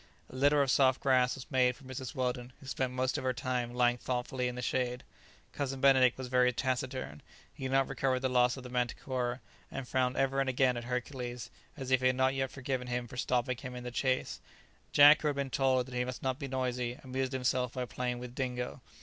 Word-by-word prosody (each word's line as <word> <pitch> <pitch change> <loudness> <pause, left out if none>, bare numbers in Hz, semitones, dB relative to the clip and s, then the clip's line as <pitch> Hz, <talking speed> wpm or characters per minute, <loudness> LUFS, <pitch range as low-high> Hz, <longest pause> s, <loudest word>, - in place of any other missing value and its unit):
A - - -11
litter 145 +2 +4
of 135 - +1
soft 130 -1 +4
grass 130 -2 +3
was 130 - -8
made 125 -2 +3
for 130 - -18
Mrs. 130 +2 -6
Weldon, 125 -1 -2
who - - -14
spent 130 -1 -2
most 130 +2 0
of - - -7
her 130 0 +1
time 125 -1 -2
lying 120 0 +2
thoughtfully 125 +1 -2
in 125 - -4
the 125 - -4
shade. 125 0 -1 0.5
Cousin 135 -1 -3
Benedict 130 -2 +5
was 130 -1 -5
very 125 0 +3
taciturn; 130 - -3 0.3
he 135 - -7
had 130 - -2
not 135 0 +3
recovered 130 -1 0
the 130 - +1
loss 125 0 +3
of 130 - -8
the 125 - -8
manticora, 125 0 -2 0.3
and 135 -2 -6
frowned 130 0 0
ever 135 0 +1
and 135 -1 +1
again 130 -1 +2
at 120 0 -5
Hercules, 125 -1 -4 0.3
as 130 -2 -5
if 130 -1 +4
he 130 - +4
had 130 - +2
not 130 +1 +2
yet 135 -1 -1
forgiven 130 -1 -3
him 125 0 -2
for 125 - -11
stopping 125 0 0
him 130 -1 -7
in 125 - -6
the 125 - -5
chase. 130 +1 -1 0.5
Jack, 145 +1 +8
who 150 - 0
had 145 - 0
been 140 -1 -2
told 130 -1 +2
that 130 - -11
he 125 0 0
must 125 0 -6
not 130 0 -1
be 140 - -4
noisy, 125 -2 -2
amused 130 0 -2
himself 125 -1 0
by 125 -1 -2
playing 125 +1 -3
with 120 0 -8
Dingo. 125 -1 -3
130 Hz, 230 wpm, -32 LUFS, 125-130 Hz, 0.5 s, Jack